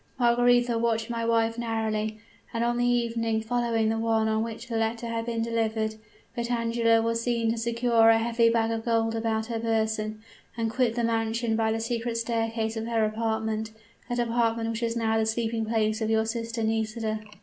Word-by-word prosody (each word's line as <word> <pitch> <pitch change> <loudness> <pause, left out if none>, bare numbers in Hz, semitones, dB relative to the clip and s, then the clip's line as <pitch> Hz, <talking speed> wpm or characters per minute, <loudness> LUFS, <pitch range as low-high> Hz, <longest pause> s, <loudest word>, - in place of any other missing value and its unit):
Margaretha 245 -1 +3
watched 230 0 0
my 230 -1 -2
wife 230 0 +1
narrowly, 220 -2 -1 0.4
and 230 - +1
on 240 0 0
the 245 - +2
evening 230 -2 +1
following 230 -1 0
the 225 0 0
one 225 -1 +1
on 220 0 +1
which 230 +1 -5
the 235 - -4
letter 225 +1 -1
had 230 0 -3
been 230 -1 -1
delivered, 225 -1 -1 0.4
Vitangela 230 -1 +1
was 230 0 0
seen 230 -1 +1
to 230 - -2
secure 235 0 +3
a 225 - +6
heavy 230 0 +2
bag 230 -1 +1
of 225 0 -2
gold 225 -1 +1
about 225 -1 -1
her 230 -1 -3
person, 220 -1 -1 0.4
and 225 -1 -1
quit 240 -1 +1
the 240 - 0
mansion 225 0 0
by 220 0 +1
the 225 - -1
secret 230 0 -2
staircase 225 -1 -1
of 225 0 -3
her 225 -2 +2
apartment 220 0 -1 0.4
that 245 - -1
apartment 230 -1 +1
which 225 +1 -4
is 230 0 -1
now 225 -1 +1
the 220 - +2
sleeping 225 0 -1
place 220 0 0
of 220 - 0
your 220 0 +2
sister 230 0 -3
Nisida. 220 0 -1
230 Hz, 190 wpm, -27 LUFS, 220-235 Hz, 0.4 s, a